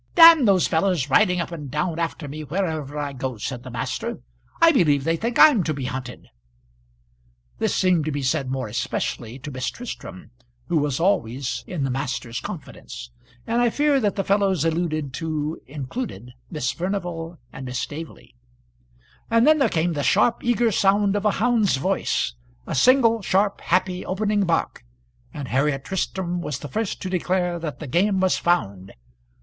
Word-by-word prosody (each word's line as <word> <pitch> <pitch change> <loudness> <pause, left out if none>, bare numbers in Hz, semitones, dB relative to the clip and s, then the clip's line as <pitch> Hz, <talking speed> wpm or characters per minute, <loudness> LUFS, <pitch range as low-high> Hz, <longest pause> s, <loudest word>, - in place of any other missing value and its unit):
"D 330 -3 +9
those 195 -4 +4
fellows 160 -5 0
riding 180 +2 +4
up 170 - -3
and 150 -5 -7
down 155 +4 -2
after 165 -2 -3
me 155 +2 -6
wherever 155 -3 -3
I 145 -1 -3
go," 130 -2 -4
said 120 +3 -5
the 130 - -9
master. 125 +1 -3 0.4
"I 330 0 +7
believe 150 - +3
they 165 +2 +1
think 230 +7 -2
I'm 290 -11 +7
to 155 - -1
be 135 -2 -4
hunted." 125 -1 -6 1.3
This - - 0
seemed 180 -5 +2
to 155 - -1
be 145 -1 -3
said 130 0 0
more 130 -2 -2
especially 115 +1 -3
to 140 +2 -8
Miss 130 -1 -2
Tristram, 225 -6 -9 0.4
who 165 - +2
was 145 -1 -1
always 125 - 0
in 165 -6 -3
the 135 - -1
master's 125 -3 -3
confidence; - - -8 0.3
and 235 +1 +1
I 240 - +4
fear 290 +2 +2
that 205 -5 0
the 195 - -1
fellows 195 -5 +1
alluded 155 -4 -1
to 155 -1 -3
included 135 - -6 0.2
Miss 150 -6 -2
Furnival 175 0 -4 0.2
and 130 - -7
Miss 125 0 -4
Staveley. 150 +6 -7 1.0
And 230 +1 +4
then 310 +1 +5
there 275 - +3
came 170 +1 0
the 145 - -2
sharp, 230 +10 +2
eager 240 -1 +2
sound 200 0 +3
of 205 +1 -1
a 210 - +4
hound's 225 - +2
voice; 65 - 0 0.3
a - - -4
single, 230 - +4
sharp, 200 +2 +1
happy 180 +1 0
opening 205 +1 0
bark, 165 - -1 0.5
and 140 -2 -7
Harriet 135 +1 0
Tristram 180 -1 -2
was 150 -6 -3
the 145 - -8
first 220 - -3
to 185 - -3
declare 180 -1 0
that 160 -3 -5
the 155 - -7
game 190 +8 +1
was 185 0 +3
found. 100 - -1
165 Hz, 175 wpm, -23 LUFS, 135-195 Hz, 1.3 s, D